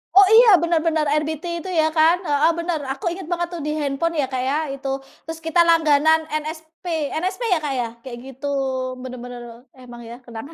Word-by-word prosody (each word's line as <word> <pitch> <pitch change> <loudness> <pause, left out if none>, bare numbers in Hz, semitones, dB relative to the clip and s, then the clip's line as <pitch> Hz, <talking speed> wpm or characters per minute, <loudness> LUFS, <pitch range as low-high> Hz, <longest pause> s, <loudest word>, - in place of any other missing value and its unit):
Oh 395 -1 +8
iya 475 +2 +8
benar 340 -1 +2
benar, 315 -2 +1 0.2
RBT 310 0 -4
itu 340 +3 -7
ya 315 0 +3
kan. 320 +2 +6
Heeh 295 +3 +3
benar, 335 -2 -2
aku 270 - -10
inget 370 +1 -6
banget 345 0 0
tuh 335 - -5
di 300 - -1
handphone 290 +3 -1
ya, - - +1
Kak, 255 - -1
ya, 280 - +1 0.2
itu. 275 0 -7 0.4
Terus 325 +1 -6
kita 325 +2 +1
langganan 315 -1 +4 0.2
NSP, 315 +2 -10 0.4
NSP 375 +5 -3
ya - - +3
Kak 285 -2 -1
ya 240 - 0 0.2
kayak 245 -2 -8
gitu 270 +2 -9 0.6
bener-bener 245 -1 -8 0.4
emang 240 -1 -11
ya 235 - -8
kenangan. 235 +7 -9
315 Hz, 195 wpm, -21 LUFS, 270-335 Hz, 0.6 s, Oh